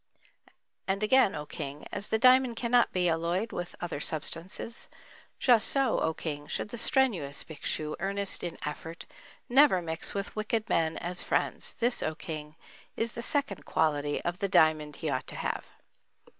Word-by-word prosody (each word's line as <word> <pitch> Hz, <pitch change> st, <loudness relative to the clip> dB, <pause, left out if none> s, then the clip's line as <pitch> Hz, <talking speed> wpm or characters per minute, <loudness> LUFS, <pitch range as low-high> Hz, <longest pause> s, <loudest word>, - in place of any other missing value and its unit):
And 195 Hz, +2 st, 0 dB
again, 235 Hz, -1 st, +4 dB
O 150 Hz, -1 st, -5 dB
King, 145 Hz, -1 st, -6 dB
as 205 Hz, -, -2 dB
the 220 Hz, -, +1 dB
diamond 255 Hz, 0 st, +5 dB
cannot 240 Hz, +1 st, +3 dB
be 180 Hz, -1 st, +1 dB
alloyed 170 Hz, +6 st, 0 dB
with 175 Hz, 0 st, -5 dB
other 175 Hz, -4 st, -4 dB
substance; 165 Hz, +9 st, -4 dB, 0.5 s
just 235 Hz, -4 st, +5 dB
so, 270 Hz, -4 st, +2 dB
O 160 Hz, -, +1 dB
King, 150 Hz, -2 st, -5 dB
should -, -, -2 dB
the 240 Hz, -, -6 dB
strenuous 195 Hz, -, +2 dB
Bhikshu, 155 Hz, 0 st, -4 dB
earnest 200 Hz, +1 st, -1 dB
in 175 Hz, -2 st, -4 dB
effort, 160 Hz, +3 st, -6 dB, 0.4 s
never 265 Hz, -6 st, +6 dB
mix 165 Hz, +1 st, -4 dB
with 200 Hz, 0 st, -4 dB
wicked 215 Hz, +1 st, -1 dB
men 160 Hz, -1 st, +1 dB
as 175 Hz, +1 st, -1 dB
friends. -, -, 0 dB
This, 240 Hz, +1 st, 0 dB
O 155 Hz, -, -1 dB
King, 155 Hz, -3 st, -7 dB, 0.4 s
is 230 Hz, +1 st, 0 dB
the 235 Hz, -, -6 dB
second 275 Hz, -, -1 dB
quality 145 Hz, -2 st, +1 dB
of 175 Hz, +1 st, -2 dB
the 200 Hz, -, -1 dB
diamond 155 Hz, -4 st, +3 dB
he 155 Hz, -, -3 dB
ought 130 Hz, -, -2 dB
to -, -, -7 dB
have. -, -, -3 dB
180 Hz, 165 wpm, -29 LUFS, 155-230 Hz, 0.5 s, never